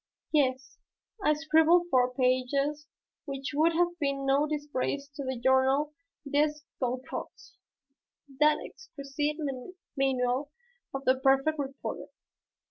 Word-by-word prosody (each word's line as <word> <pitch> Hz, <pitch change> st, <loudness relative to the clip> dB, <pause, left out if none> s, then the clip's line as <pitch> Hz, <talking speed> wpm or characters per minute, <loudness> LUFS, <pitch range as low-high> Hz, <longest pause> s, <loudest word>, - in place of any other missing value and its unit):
Yes, 260 Hz, -4 st, 0 dB, 0.4 s
I 300 Hz, -, +4 dB
scribbled 320 Hz, +3 st, +4 dB
four 250 Hz, -1 st, +4 dB
pages 275 Hz, +4 st, +1 dB, 0.4 s
which 275 Hz, -2 st, -4 dB
would 320 Hz, +3 st, +3 dB
have 345 Hz, +1 st, +1 dB
been 275 Hz, -2 st, -1 dB
no 275 Hz, +2 st, +3 dB
disgrace 290 Hz, -2 st, -2 dB
to 285 Hz, 0 st, -7 dB
the 260 Hz, -1 st, -3 dB
Journal 265 Hz, +4 st, +3 dB, 0.3 s
des 295 Hz, +2 st, +2 dB, 0.3 s
Goncourts, 260 Hz, +8 st, -5 dB, 0.8 s
that 300 Hz, 0 st, +5 dB
exquisite 295 Hz, -, -4 dB, 0.6 s
manual 265 Hz, 0 st, 0 dB, 0.4 s
of 270 Hz, 0 st, -5 dB
the 260 Hz, 0 st, +3 dB
perfect 270 Hz, +3 st, +3 dB
reporter. 275 Hz, -1 st, -5 dB
280 Hz, 110 wpm, -29 LUFS, 265-300 Hz, 0.8 s, that